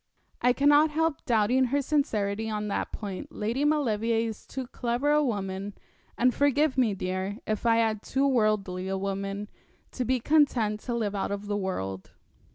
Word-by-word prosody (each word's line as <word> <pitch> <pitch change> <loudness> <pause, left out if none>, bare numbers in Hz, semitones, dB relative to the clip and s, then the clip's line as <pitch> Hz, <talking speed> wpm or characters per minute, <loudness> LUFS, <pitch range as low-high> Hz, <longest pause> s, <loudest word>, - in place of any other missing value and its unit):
'I 245 +1 +4
cannot 290 +3 +5
help 320 0 -1
doubting 240 +2 +3
her 280 +3 +1
sincerity 225 -7 0
on 210 -1 -3
that - - -2
point. 200 -4 -6
Lady 230 +6 -2
Maulevrier 230 -6 +1
is 220 -2 -8
too 265 -1 -5
clever 245 +4 -1
a 300 0 +4
woman, 200 -4 -3 0.4
and 250 +1 +3
forgive 285 0 +2
me, 240 -6 +2
dear, 185 +2 -3
if 215 +2 -1
I 230 0 +4
add 220 -2 0
too 270 +4 0
worldly 210 -7 +1
a 195 0 -1
woman, 195 +1 -3 0.4
to 255 - -3
be 255 +1 +1
content 240 -7 +2
to 240 +2 -4
live 215 -3 -1
out 200 - -2
of 200 0 -4
the 205 0 -2
world. 95 - -4
225 Hz, 170 wpm, -27 LUFS, 200-265 Hz, 0.4 s, cannot